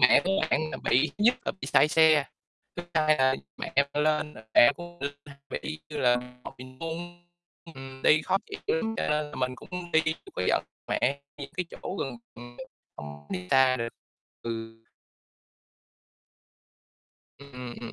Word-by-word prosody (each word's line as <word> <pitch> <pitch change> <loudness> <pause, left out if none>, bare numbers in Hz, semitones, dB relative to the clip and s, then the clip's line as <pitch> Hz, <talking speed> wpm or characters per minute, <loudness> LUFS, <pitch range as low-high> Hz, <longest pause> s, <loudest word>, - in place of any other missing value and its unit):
Mẹ 125 +3 +7
của 190 - +1 0.2
bạn - - +3
là - - -4
bị 140 +5 +4
thứ 210 - +1
nhất 245 +2 +6
là - - -1
bị - - -4
say 150 - +5
xe, 155 -2 +5 0.5
thứ 175 - -4
hai 155 -1 +4
là 130 0 +4 0.2
mẹ - - -5
bạn 140 +1 +3
lên 150 -1 +1
là 110 - -12
mẹ 120 - +8
cũng 175 - -7
hông 175 0 -15
được 140 0 -3
nè, 145 - -11 0.2
mẹ - - -2
đi 155 0 -4
như 150 - -5
là 125 -2 +4
mà 125 0 -8
mình 130 0 -11
cũng 175 +2 -6 0.5
ừm, 135 0 -10
đi 155 +1 +5
khó 190 - +2
chịu - - -6 0.2
lắm 225 +7 -1
cho - - -1
nên 150 0 0
là - - -10
mình 125 0 -1
cũng 180 -1 -7
đi 160 0 +5
chưa 160 0 -3
có - - -1
dẫn - - +2 0.2
mẹ 140 +2 +1 0.2
đi 140 -1 -6
cái 180 - 0
chỗ 190 - -6
gần, 135 -3 -3 0.8
hông 75 0 -9
đi 90 0 -4
xa 130 -1 +5
được. 115 -1 -2 0.5
Ừ. 115 -1 -5 2.6
Ừm, 125 -3 -8
ừm. 115 - -7
140 Hz, 185 wpm, -28 LUFS, 125-160 Hz, 2.6 s, mẹ